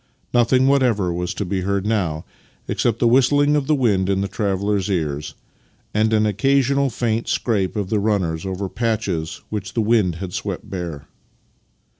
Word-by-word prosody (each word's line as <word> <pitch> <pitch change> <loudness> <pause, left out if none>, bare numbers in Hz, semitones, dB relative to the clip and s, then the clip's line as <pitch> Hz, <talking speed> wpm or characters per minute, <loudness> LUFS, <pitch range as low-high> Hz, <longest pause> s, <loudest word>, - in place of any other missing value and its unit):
Nothing 125 +2 +4
whatever 120 -10 +2
was 90 0 -2
to 100 - -3
be 95 +1 -2
heard 100 +1 -1
now 90 -8 -1 0.4
except 115 -2 0
the 120 - +2
whistling 145 +4 +4
of 145 -2 0
the 155 - +3
wind 100 -8 +1
in 95 0 +1
the 100 - -1
travellers' 100 0 -1
ears 75 -6 -2 0.6
and 110 +1 +2
an 110 -1 +3
occasional 135 +5 +2
faint 115 -1 -1
scrape 100 -5 0
of 100 -3 -3
the 110 - +2
runners 95 -6 0
over 95 +1 -3
patches 105 -6 -2
which 105 -1 -5
the - - +1
wind 105 -6 +2
had 90 +1 -6
swept - - -4
bare. 85 -6 -5
105 Hz, 165 wpm, -21 LUFS, 95-120 Hz, 0.6 s, Nothing